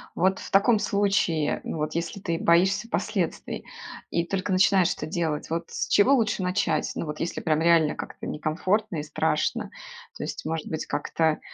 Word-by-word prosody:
вот 190 Hz, +2 st, +2 dB
в -, -, -8 dB
таком 210 Hz, +3 st, +4 dB
случае, 195 Hz, -8 st, +1 dB
ну, -, -, -4 dB
вот, 155 Hz, 0 st, -2 dB
если 170 Hz, +4 st, -3 dB
ты 170 Hz, -3 st, -2 dB
боишься 190 Hz, +7 st, +3 dB
последствий 195 Hz, -8 st, -2 dB, 0.5 s
и 170 Hz, -, 0 dB
только 190 Hz, +2 st, -2 dB
начинаешь 190 Hz, -1 st, +4 dB
это -, -, -5 dB
делать, 160 Hz, -3 st, -2 dB
вот 165 Hz, +1 st, -1 dB
с -, -, -3 dB
чего 205 Hz, +7 st, +5 dB
лучше 220 Hz, -5 st, +1 dB
начать? 180 Hz, -4 st, 0 dB
Ну, -, -, -3 dB
вот 150 Hz, 0 st, -6 dB
если 170 Hz, -, -3 dB
прям 155 Hz, -1 st, +1 dB
реально 165 Hz, -2 st, +4 dB
как-то -, -, -8 dB
некомфортно 180 Hz, +6 st, -1 dB
и 150 Hz, -, -2 dB
страшно. 150 Hz, -, -1 dB, 0.5 s
То -, -, -5 dB
есть, -, -, -5 dB
может 160 Hz, 0 st, -2 dB
быть, 160 Hz, -, -4 dB
как-то, 160 Hz, +1 st, 0 dB
170 Hz, 175 wpm, -26 LUFS, 160-195 Hz, 0.5 s, чего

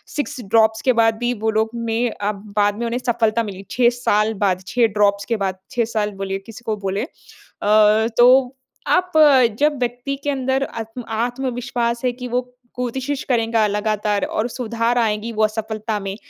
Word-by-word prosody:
6 290 Hz, -2 st, -3 dB
drops 220 Hz, +2 st, +3 dB
के 255 Hz, -, +4 dB
बाद 225 Hz, -1 st, +3 dB
भी 240 Hz, +1 st, -1 dB
वो 220 Hz, -, +2 dB
लोग 220 Hz, 0 st, +1 dB
में 230 Hz, +1 st, -1 dB
अ, 205 Hz, +1 st, -2 dB
बाद 205 Hz, 0 st, -1 dB
में 235 Hz, -, -2 dB
उन्हें 235 Hz, +2 st, -2 dB
सफलता 230 Hz, -1 st, +1 dB
मिली 195 Hz, -2 st, -7 dB
6 240 Hz, -1 st, +4 dB
साल 215 Hz, -1 st, +2 dB
बाद, 190 Hz, -2 st, 0 dB
6 240 Hz, +1 st, +3 dB
ड्रॉप्स 200 Hz, -1 st, +1 dB
के 230 Hz, -, +2 dB
बाद 185 Hz, 0 st, -3 dB
6 235 Hz, -2 st, +1 dB
साल 210 Hz, -1 st, 0 dB
बोलिए 195 Hz, 0 st, -3 dB
किसी 225 Hz, +2 st, -11 dB
को 215 Hz, -1 st, -1 dB
बोलें। 195 Hz, +3 st, -1 dB
अ, 215 Hz, -6 st, +1 dB
तो 250 Hz, +1 st, +5 dB, 0.3 s
आप 365 Hz, 0 st, +2 dB, 0.5 s
जब 295 Hz, 0 st, +2 dB
व्यक्ति 245 Hz, +3 st, -2 dB
के 290 Hz, -, -1 dB
अंदर 265 Hz, -1 st, 0 dB
आत्म 225 Hz, -1 st, -6 dB, 0.2 s
आत्मविश्वास 245 Hz, -1 st, -2 dB
है 250 Hz, -, +2 dB
कि 250 Hz, +1 st, -7 dB
वो 250 Hz, +1 st, -2 dB, 0.3 s
कोशिश 260 Hz, +3 st, -3 dB
करेगा 230 Hz, -3 st, +1 dB
लगातार 210 Hz, 0 st, -1 dB
और 220 Hz, +3 st, -2 dB
सुधार 235 Hz, 0 st, -1 dB
आएगी 220 Hz, 0 st, 0 dB
वो 215 Hz, 0 st, +3 dB
सफलता 215 Hz, 0 st, -4 dB
में, 195 Hz, 0 st, -5 dB
230 Hz, 175 wpm, -20 LUFS, 210-245 Hz, 0.5 s, तो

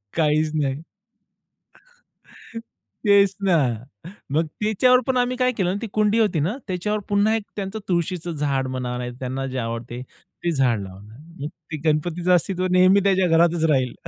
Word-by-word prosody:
काहीच 155 Hz, -1 st, +2 dB
नाही. 140 Hz, -1 st, -1 dB, 2.3 s
तेच 200 Hz, -1 st, +5 dB
ना. 180 Hz, -3 st, +4 dB, 0.8 s
मग 160 Hz, +2 st, +2 dB
त्याच्यावर 250 Hz, +4 st, +4 dB
पण 260 Hz, -, 0 dB
आम्ही 250 Hz, 0 st, +1 dB
काय 255 Hz, 0 st, +2 dB
केलं 190 Hz, -6 st, -1 dB
ना -, -, -2 dB
ती -, -, -2 dB
कुंडी 215 Hz, +1 st, +2 dB
होती 205 Hz, -8 st, +2 dB
ना, 185 Hz, -, -1 dB
त्याच्यावर 210 Hz, +4 st, -1 dB
पुन्हा 205 Hz, +2 st, +2 dB
एक 220 Hz, -, -3 dB
त्यांचं 200 Hz, +1 st, -4 dB
तुळशीचं 175 Hz, -1 st, -1 dB
झाड 140 Hz, -3 st, -1 dB
म्हणा, 125 Hz, -1 st, -3 dB
नाही, 125 Hz, 0 st, -4 dB
त्यांना 130 Hz, +1 st, -3 dB
जे 130 Hz, 0 st, -4 dB
आवडते 115 Hz, +1 st, -4 dB
ते 170 Hz, +6 st, -7 dB
झाड 125 Hz, -7 st, +1 dB
लावणार. 100 Hz, +5 st, -12 dB, 0.2 s
मग 145 Hz, -, -3 dB, 0.2 s
ते -, -, -1 dB
गणपतीचं 175 Hz, +4 st, 0 dB
अस्तित्व 185 Hz, +1 st, 0 dB
नेहमी 185 Hz, +2 st, +5 dB
त्याच्या 190 Hz, -2 st, +3 dB
घरातच 165 Hz, 0 st, +3 dB
राहील. 130 Hz, -4 st, +1 dB
170 Hz, 160 wpm, -23 LUFS, 135-200 Hz, 2.3 s, तेच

